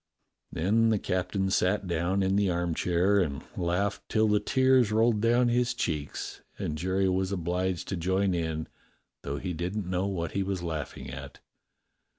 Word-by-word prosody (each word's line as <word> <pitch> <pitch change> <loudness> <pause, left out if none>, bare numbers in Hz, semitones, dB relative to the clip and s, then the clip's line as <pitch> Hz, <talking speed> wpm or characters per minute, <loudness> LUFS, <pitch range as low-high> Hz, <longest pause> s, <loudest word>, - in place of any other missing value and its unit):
Then 110 +7 +2
the 110 - +3
captain 95 +1 -1
sat 95 +2 +2
down 90 +3 0
in 95 +1 +1
the 100 -1 +2
armchair 90 +3 +1
and 70 -7 -1
laughed 90 +3 0
till 110 0 +3
the 105 0 +3
tears 130 -3 +3
rolled 110 0 +3
down 120 +2 +3
his 125 +1 +1
cheeks, 75 - -3 0.2
and 75 - -3
Jerry 95 +4 0
was 95 +1 0
obliged 90 -1 -1
to 95 - -1
join 95 +2 +1
in, 80 -2 -2 0.5
though 70 +1 -4
he 90 +6 -3
didn't 90 +5 -3
know 90 +1 0
what 85 -4 -2
he 100 - -1
was 95 -2 -2
laughing 75 -4 -5
at. 70 +2 -8
95 Hz, 160 wpm, -28 LUFS, 85-100 Hz, 0.5 s, the